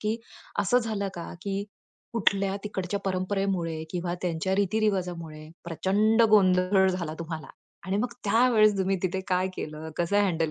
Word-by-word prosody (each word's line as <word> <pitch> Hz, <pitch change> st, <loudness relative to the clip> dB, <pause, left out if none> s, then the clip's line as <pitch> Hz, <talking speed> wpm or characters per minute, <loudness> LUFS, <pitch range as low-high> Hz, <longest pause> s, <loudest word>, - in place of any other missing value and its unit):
की 215 Hz, +1 st, 0 dB, 0.4 s
असं 245 Hz, +6 st, +4 dB
झालं 215 Hz, -4 st, -2 dB
का 170 Hz, -, -6 dB
की 200 Hz, 0 st, -2 dB, 0.5 s
कुठल्या 200 Hz, -3 st, +1 dB
तिकडच्या 200 Hz, -1 st, -3 dB
परंपरेमुळे 185 Hz, -3 st, -1 dB
किंवा 175 Hz, -1 st, -2 dB
त्यांच्या 180 Hz, +1 st, 0 dB
रीती 205 Hz, +2 st, +1 dB
रिवाजामुळे 175 Hz, -7 st, -2 dB, 0.2 s
प्रचंड 205 Hz, +7 st, +2 dB
गोंधळ 190 Hz, -1 st, +5 dB
झाला 175 Hz, -4 st, -2 dB
तुम्हाला 160 Hz, -1 st, -5 dB, 0.4 s
आणि 190 Hz, +1 st, 0 dB
मग 225 Hz, +4 st, -1 dB
त्यावेळेस 215 Hz, -1 st, +4 dB
तुम्ही 190 Hz, 0 st, +1 dB
तिथे 190 Hz, 0 st, 0 dB
काय 185 Hz, 0 st, +1 dB
केलं? 155 Hz, +1 st, -6 dB
कसं 175 Hz, +4 st, +2 dB
हँडल 165 Hz, -5 st, +1 dB
190 Hz, 145 wpm, -27 LUFS, 175-205 Hz, 0.5 s, गोंधळ